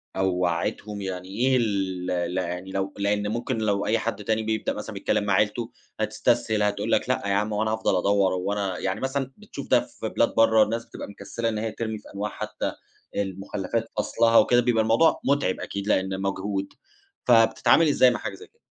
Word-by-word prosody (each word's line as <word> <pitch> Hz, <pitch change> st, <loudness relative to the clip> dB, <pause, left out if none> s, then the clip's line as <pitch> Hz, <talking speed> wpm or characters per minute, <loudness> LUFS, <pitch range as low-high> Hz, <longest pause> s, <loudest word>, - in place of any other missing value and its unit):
أو 95 Hz, 0 st, +2 dB
وعّيتهم. 90 Hz, +4 st, -2 dB
يعني 95 Hz, -1 st, -5 dB
إيه 130 Hz, +6 st, +2 dB
ال 95 Hz, -5 st, -1 dB, 0.3 s
ل -, -, -1 dB
يعني، 90 Hz, +1 st, -3 dB
لو 95 Hz, 0 st, -2 dB
لإن 105 Hz, +1 st, 0 dB
ممكن 120 Hz, +3 st, -2 dB
لو 105 Hz, -2 st, 0 dB
أي 115 Hz, +2 st, +2 dB
حد 110 Hz, -2 st, -3 dB
تاني 110 Hz, +1 st, 0 dB
بيبدأ 110 Hz, 0 st, -1 dB
مثلًا -, -, -6 dB
بيتكلَّم -, -, 0 dB
مع 100 Hz, -2 st, +1 dB
عيلته 105 Hz, +4 st, +1 dB, 0.3 s
هتستسهِل، 105 Hz, -1 st, +1 dB
هتقول 100 Hz, 0 st, -1 dB
لك: -, -, +2 dB
"لأ -, -, +1 dB
يا 100 Hz, -, +1 dB
عم، 105 Hz, +2 st, 0 dB
هو 105 Hz, -, 0 dB
أنا 110 Hz, 0 st, 0 dB
هافضَل 110 Hz, -4 st, +1 dB
ادوّر؟" 100 Hz, 0 st, +2 dB
هو 95 Hz, +2 st, -1 dB
أنا 100 Hz, -3 st, -2 dB
يعني، 95 Hz, 0 st, -2 dB
مثلًا 135 Hz, 0 st, -2 dB
بتشوف -, -, -9 dB
ده -, -, +6 dB
في -, -, -6 dB
بلاد -, -, +1 dB
برا، 110 Hz, -1 st, +6 dB
الناس 115 Hz, +2 st, -3 dB
بتبقى -, -, -8 dB
مكسّلة 115 Hz, +3 st, -4 dB
إن 110 Hz, -, -3 dB
هي 110 Hz, 0 st, -2 dB
ترمِي 110 Hz, -1 st, -4 dB
في -, -, -14 dB
أنواع 105 Hz, +1 st, -3 dB
حتى 110 Hz, 0 st, -4 dB, 0.4 s
المخلَّفات 100 Hz, +3 st, -3 dB
فَصلها 115 Hz, +2 st, +3 dB
وكده، 120 Hz, 0 st, +5 dB
بيبقى 115 Hz, -2 st, +2 dB
الموضوع 115 Hz, +9 st, +3 dB
متعِب 140 Hz, -9 st, +1 dB
أكيد 100 Hz, +1 st, -5 dB
لإنه 95 Hz, -2 st, +1 dB
مجهود. 100 Hz, 0 st, -3 dB, 0.5 s
فبتتعامَل 120 Hz, +7 st, +5 dB
إزاي 130 Hz, -3 st, +5 dB
مع -, -, -3 dB
حاجة -, -, -5 dB
زي 435 Hz, -, -13 dB
كده؟ 465 Hz, -, -39 dB
105 Hz, 200 wpm, -25 LUFS, 95-115 Hz, 0.5 s, ده